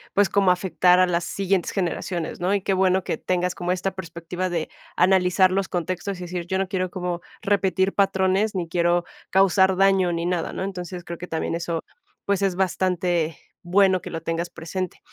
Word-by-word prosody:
pues, 205 0 +5
como 195 -1 +2
afectar 180 0 +3
a 185 - +6
las 175 -1 0
siguientes 195 -2 -1
generaciones, 175 -2 -3
¿no? 185 +3 +1
Y 200 - -1
qué 195 - +1
bueno 190 0 +2
que 160 - -2
tengas 180 0 -1
como 175 -1 -3
esta 185 +1 -1
perspectiva 180 0 -5
de 170 -3 -2 0.3
analizar 185 0 +4
los 195 +1 0
contextos 185 +2 -3
y - - -10
decir: 175 -1 -5
"Yo 190 - 0
no 190 0 0
quiero 185 -1 -1
como 180 -1 -4 0.2
repetir 195 -2 +1
patrones, 195 +1 +2
ni 175 -3 -2
quiero 175 0 +1 0.2
causar 190 0 +4
daño, 195 -2 +4
ni 170 0 -2
nada", 175 -2 -1
¿no? - - -4
Entonces, 180 -2 -5
creo 170 0 -7
que 180 - -7
también 160 -1 -2
eso, 170 -1 -2 0.4
pues, 200 -1 +1
es 195 -2 +1
bastante 180 -3 0 0.2
bueno 185 +1 +3
que - - -8
lo 165 - -5
tengas 165 +1 -2
presente. 185 +2 -5
185 Hz, 190 wpm, -24 LUFS, 175-190 Hz, 0.4 s, a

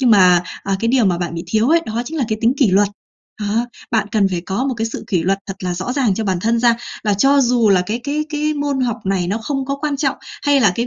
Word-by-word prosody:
Nhưng 250 -3 +3
mà, 180 -4 +6 0.2
à, 195 -1 -1
cái 230 - 0
điều 250 -2 +3
mà 180 -3 +1
bạn 175 -1 -3
bị 165 - -5
thiếu 220 +4 +1
ấy, 335 +1 +4
đó 225 +2 -2
chính 320 +4 -5
là 260 - +1
cái 215 - -1
tính 235 +2 +3
kỷ 260 -8 +3
luật. 200 +2 +4 0.5
Đó, 215 +4 0 0.2
bạn 215 -3 +1
cần 205 -3 +2
phải 175 -2 -2
có 195 +8 -2
một 270 -2 -1
cái 225 0 -1
sự 225 - -6
kỷ 180 -5 0
luật 195 +2 +1
thật 195 - -5
là 180 -1 -2
rõ 190 +8 -3
ràng 255 -8 +1
cho 220 +2 -3
bản 185 -3 -1
thân 230 +2 +1
ra. 235 -1 +3 0.3
Và 210 - +2
cho 275 +7 +4
dù 240 -3 +3
là 185 -2 +4
cái 225 +3 -2
cái 300 +2 -1
cái 305 0 -1
môn 285 -2 -1
học 240 -2 0
này 190 -2 0
nó 200 +5 -1
không 270 +4 -3
có 275 - -2
quan 295 -2 -1
trọng 275 -1 0 0.3
hay 285 -1 +3
là 200 -6 +4
cái 235 +1 -1
225 Hz, 295 wpm, -18 LUFS, 195-270 Hz, 0.5 s, mà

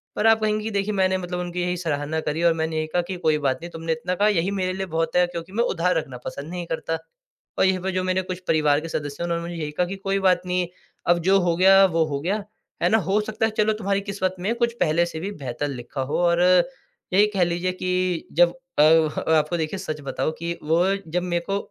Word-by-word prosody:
पर 220 - +2
आप 225 0 +5
कहेंगी 215 0 0
कि 220 - -3
देखिए 200 +1 -1
मैंने 190 -1 +2
मतलब 180 -1 -4
उनकी 180 0 -3
यही 180 0 -1
सराहना 160 -2 -2
करी 155 +3 -2
और 170 -1 +5
मैंने 160 0 -2
यही 155 0 -1
कहा 175 +3 0
कि 185 +2 -5
कोई 155 -3 +2
बात 135 -2 +1
नहीं 170 - -7
तुमने 165 0 -4
इतना 160 +3 -3
कहा 205 +3 +3
यही 195 -2 +1
मेरे 185 0 -1
लिए 190 0 -3
बहुत 165 0 -1
है, 180 0 +5
क्योंकि 175 +1 -7
मैं 230 +3 +2
उधार 180 -5 +1
रखना 135 -5 -4
पसंद 145 +3 -6
नहीं 175 -1 -5
करता। 165 0 -2 0.6
और - - +5
यहीं 190 -1 +2
पर 190 +1 -2
जो 185 0 -1
मेरे 185 0 +1
कुछ 180 -1 -5
परिवार 150 -2 +3
के 165 - -6
सदस्य 145 +1 -4
हैं - - 0
उन्होंने 170 0 -1
मुझे 175 - -6
यही 150 0 -3
कहा 180 +4 0
कि 195 - -4
कोई 195 0 -1
बात 185 -2 +3
नहीं 180 0 0 0.4
अब 175 0 +4
जो 195 +1 +6
हो 175 -1 +1
गया 195 +1 +7
वो 165 -3 +2
हो 140 -2 -3
गया, 200 +5 -1 0.4
है - - +4
ना? 220 - +4
हो 195 +2 +1
सकता 220 +1 -1
है 220 - 0
चलो 215 0 +3
तुम्हारी 200 0 0
किस्मत 195 -2 -2
में 200 +6 0
कुछ 235 -1 0
पहले 165 +3 +3
से 160 -2 -6
भी 195 +4 -4
बेहतर 140 -3 -4
लिखा 125 +1 -5
हो। 130 +2 -2
और 170 0 +3 0.7
यही 205 +3 +6
कह 185 - +4
लीजिए 175 +1 0
कि 185 -2 -1
जब 175 +1 +5 0.3
अ, 150 - +8
आपको 160 +1 +3
देखिए 160 +4 -2
सच 155 -5 -5
बताऊँ 140 +3 -2
कि 170 +1 -3
वो 165 +4 +2 0.3
जब 180 +1 0
मेरे 175 -1 -1
को 200 - +1
175 Hz, 250 wpm, -24 LUFS, 160-190 Hz, 0.7 s, अ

